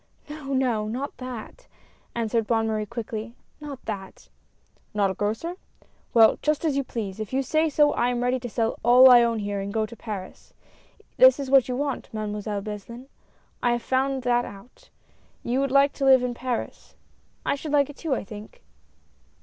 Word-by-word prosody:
"No, 300 Hz, -1 st, -9 dB
no, 255 Hz, -6 st, 0 dB
not 255 Hz, +6 st, -4 dB
that!" 255 Hz, -, -8 dB, 0.5 s
answered 230 Hz, -1 st, 0 dB
Bonne 225 Hz, -1 st, +1 dB
Maide 215 Hz, -1 st, -2 dB
quickly, 230 Hz, 0 st, -6 dB
" -, -, -40 dB
not 285 Hz, -3 st, -8 dB
that! 195 Hz, -, -7 dB, 0.3 s
" -, -, -39 dB
"Not 200 Hz, -2 st, +2 dB
a -, -, -3 dB
grocer? 220 Hz, -, -3 dB, 0.5 s
Well, 225 Hz, -2 st, +5 dB
just 305 Hz, +2 st, 0 dB
as 300 Hz, -4 st, +1 dB
you 275 Hz, -, +1 dB
please. 215 Hz, -6 st, -5 dB
If 215 Hz, +3 st, -6 dB
you 270 Hz, +1 st, +1 dB
say 315 Hz, +4 st, +1 dB
so, 295 Hz, 0 st, +3 dB
I 240 Hz, -, +1 dB
am 245 Hz, 0 st, -1 dB
ready 250 Hz, +1 st, +1 dB
to 245 Hz, 0 st, -6 dB
sell 225 Hz, 0 st, -1 dB
all 250 Hz, +2 st, +8 dB
I 245 Hz, -1 st, +8 dB
own 235 Hz, -1 st, +1 dB
here 205 Hz, -1 st, -3 dB
and 195 Hz, +1 st, -4 dB
go 220 Hz, +1 st, 0 dB
to 225 Hz, +2 st, -11 dB
Paris. 205 Hz, -4 st, -8 dB, 0.6 s
That -, -, +7 dB
is 270 Hz, -2 st, -4 dB
what 270 Hz, -2 st, +5 dB
you 250 Hz, -, -1 dB
want. 280 Hz, 0 st, -3 dB
Mademoiselle 210 Hz, -1 st, -4 dB
Beslin, 220 Hz, +5 st, -8 dB, 0.5 s
I 240 Hz, -, +2 dB
have 240 Hz, -, -3 dB
found 265 Hz, 0 st, 0 dB
that 245 Hz, -1 st, +2 dB
out 245 Hz, -, -13 dB, 0.3 s
— -, -, -36 dB
you 245 Hz, +3 st, 0 dB
would 275 Hz, 0 st, +1 dB
like 275 Hz, +1 st, +4 dB
to 275 Hz, -, -2 dB
live 260 Hz, -2 st, +6 dB
in 250 Hz, -1 st, -1 dB
Paris 245 Hz, 0 st, -5 dB, 0.2 s
— -, -, -38 dB
and -, -, +1 dB
I -, -, +1 dB
should 290 Hz, +1 st, -6 dB
like 285 Hz, -2 st, +3 dB
it 290 Hz, -, -19 dB
too, 315 Hz, -6 st, -1 dB
I -, -, -4 dB
think." 210 Hz, +2 st, -11 dB
240 Hz, 205 wpm, -25 LUFS, 215-270 Hz, 0.6 s, all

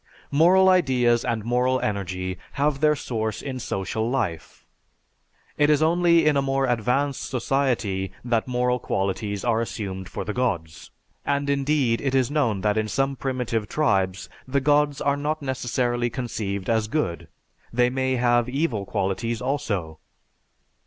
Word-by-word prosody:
"_) -, -, -46 dB, 0.3 s
Moral 180 Hz, +6 st, +5 dB
ideas 125 Hz, -10 st, +3 dB
and 110 Hz, -2 st, -2 dB
moral 125 Hz, +2 st, +2 dB
energy 95 Hz, -2 st, -3 dB
have 140 Hz, 0 st, 0 dB
their 150 Hz, 0 st, +4 dB
source 110 Hz, -5 st, -3 dB
in 130 Hz, -2 st, -5 dB
social 110 Hz, 0 st, -2 dB
life. 100 Hz, -12 st, -3 dB, 0.9 s
It 145 Hz, 0 st, +4 dB
is 150 Hz, 0 st, +4 dB
only 170 Hz, 0 st, +4 dB
in 150 Hz, -1 st, +4 dB
a 140 Hz, -, +3 dB
more 135 Hz, 0 st, +1 dB
advanced 125 Hz, +3 st, 0 dB
society 120 Hz, -7 st, 0 dB
that 120 Hz, -1 st, 0 dB
moral 125 Hz, 0 st, +1 dB
qualities 100 Hz, 0 st, -2 dB
are 115 Hz, -1 st, +2 dB
assumed 95 Hz, -5 st, -5 dB
for -, -, -5 dB
the 105 Hz, -, -3 dB
gods. 85 Hz, -10 st, -2 dB, 0.3 s
And 140 Hz, 0 st, 0 dB
indeed, 140 Hz, -4 st, +1 dB
it 135 Hz, -1 st, 0 dB
is 130 Hz, 0 st, +2 dB
known 120 Hz, -10 st, +1 dB
that 105 Hz, +2 st, +1 dB
in 110 Hz, -, -1 dB
some 135 Hz, +5 st, 0 dB
primitive 125 Hz, -5 st, -2 dB
tribes, 100 Hz, -10 st, 0 dB, 0.2 s
the 140 Hz, +2 st, +1 dB
gods 145 Hz, 0 st, +2 dB
are 140 Hz, 0 st, +2 dB
not 150 Hz, +1 st, -2 dB
necessarily 125 Hz, -2 st, -1 dB
conceived 105 Hz, -5 st, -4 dB
as 110 Hz, -2 st, +1 dB
good, 85 Hz, -, -2 dB, 0.4 s
they 125 Hz, +1 st, +2 dB
may 130 Hz, 0 st, 0 dB
have 120 Hz, 0 st, +2 dB
evil 125 Hz, -8 st, -1 dB
qualities 110 Hz, +3 st, -1 dB
also. 100 Hz, -, -2 dB
125 Hz, 150 wpm, -24 LUFS, 105-140 Hz, 0.9 s, Moral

